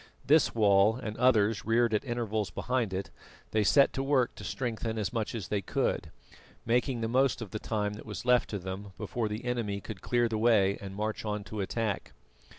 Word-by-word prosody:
This 150 -3 +4
wall, 105 0 +5
and 110 -4 -5
others 115 -4 +3
reared 115 +1 +2
at 105 - +1
intervals 110 -5 -2
behind 120 +4 -1
it, 95 +1 -4 0.4
they 110 -1 +2
set 105 +8 +5
to 135 - -2
work 135 -3 +2
to - - -11
strengthen 115 -3 -3
as 105 +1 -2
much 115 -1 -2
as 105 -6 -5
they 105 -1 0
could, - - -1 0.6
making 120 +1 +1
the 115 - 0
most 130 +3 +2
of 110 -5 -7
the 110 - -4
time 105 -2 -2
that 105 - -10
was 105 +2 -6
left 125 -1 +3
to 105 - -3
them 95 +1 -6
before 115 -3 -2
the 105 +4 -5
enemy 115 -5 -1
could 100 -2 -8
clear 120 -1 +2
the 110 -1 -2
way 105 -4 +3
and 95 -1 -7
march 110 +1 -3
on 105 -1 -3
to 105 0 -5
attack. 105 0 -2
110 Hz, 205 wpm, -30 LUFS, 105-120 Hz, 0.6 s, wall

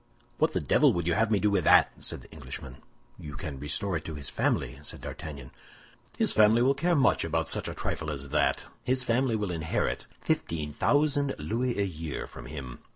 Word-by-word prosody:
"What - - +3
the - - +1
devil - - +4
would 85 -1 -1
you 85 - +2
have 110 +1 +2
me 105 -2 +3
do 105 0 +2
with 95 -4 +2
that?" - - +6
said - - 0
the - - -17
Englishman. 65 -1 -8 0.4
"You 75 -1 -8
can 70 -2 -6
restore 85 +6 -1
it 80 - -9
to 80 - -5
his 70 -2 -3
family," 65 +1 0
said 75 - -6
D'Artagnan. 70 -5 -7 0.7
"His - - +2
family 110 +2 +5
will 135 +2 +4
care 170 +5 +1
much 140 - +3
about 80 0 -1
such - - 0
a - - -5
trifle 80 - -3
as 70 -2 -4
that! - - +1 0.2
His 130 0 +1
family 125 0 +1
will 105 -4 -1
inherit 80 -1 -1
fifteen 75 -3 -2
thousand 145 - +2
louis 120 +2 -1
a 100 - +2
year 80 -5 -5
from - - -11
him. 65 -4 -7
85 Hz, 205 wpm, -28 LUFS, 75-115 Hz, 0.7 s, that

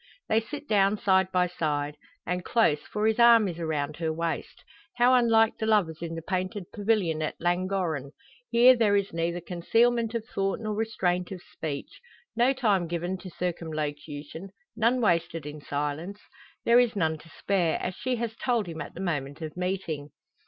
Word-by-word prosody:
They 220 - +3
sit 290 +6 -8
down 200 -1 +3
side 190 -2 +2
by 180 0 +3
side; 150 -4 -2 0.3
and 180 +1 -2
close, 170 -11 +2
for 210 0 -3
his 220 +1 +2
arm 235 -3 +7
is 175 -2 -5
around 155 -2 -2
her 160 -1 -1
waist. 165 +1 -4 0.3
How 245 +1 +5
unlike 225 -3 +4
the 220 - -1
lovers 175 -8 +2
in 165 -1 -4
the 165 - -6
painted 185 +1 -3
pavilion 200 -7 +1
at 155 - -3
Llangorren! 175 -5 -1 0.4
Here 245 +2 +7
there 215 -4 +3
is 200 -3 0
neither 170 +1 -1
concealment 225 +7 +1
of 225 -1 -2
thought 195 -1 -2
nor 215 -1 -3
restraint 190 -5 -1
of 185 -2 -7
speech 145 -3 -6 0.3
no 240 +3 +4
time 210 -9 +1
given 175 +2 -3
to 185 - -9
circumlocution 155 -1 -5 0.3
none 230 +3 +2
wasted 170 -5 +1
in 150 0 -7
silence. 150 +8 -3 0.5
There 235 +1 +6
is 245 -3 +2
none 160 -4 0
to 165 - -16
spare, 175 -2 0
as 185 - -3
she 255 +6 -2
has 230 -1 -3
told 240 -4 0
him 160 -2 -6
at 145 - -8
the 180 - -6
moment 145 -4 -3
of 155 -1 -6
meeting. 180 -5 -3
180 Hz, 175 wpm, -27 LUFS, 160-220 Hz, 0.5 s, arm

